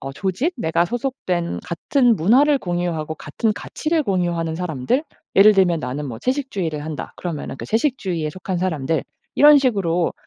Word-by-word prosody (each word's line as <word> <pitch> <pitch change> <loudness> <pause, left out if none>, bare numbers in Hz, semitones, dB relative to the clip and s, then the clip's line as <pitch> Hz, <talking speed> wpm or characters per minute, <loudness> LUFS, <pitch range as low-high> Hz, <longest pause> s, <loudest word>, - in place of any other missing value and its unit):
어 135 0 -6
조직 195 - -1
내가 170 -4 +1
소속된 225 -7 -2
같은 235 - +2
문화를 270 - +4
공유하고 175 -4 -2
같은 185 +9 -2
가치를 310 +9 -2
공유하는 175 - -1
사람들 170 - -1 0.3
예를 210 +2 +8
들면 175 -4 +3
나는 140 +3 -4
뭐 115 -3 -6
채식주의를 195 - -2
한다. 155 -2 -6
그러면은 160 -6 -5
그 - - -7
채식주의에 210 - -1
속한 185 0 -4
사람들 160 -5 -1 0.3
이런 295 0 +8
식으로 190 -10 +1
180 Hz, 370 characters per minute, -21 LUFS, 160-240 Hz, 0.3 s, 예를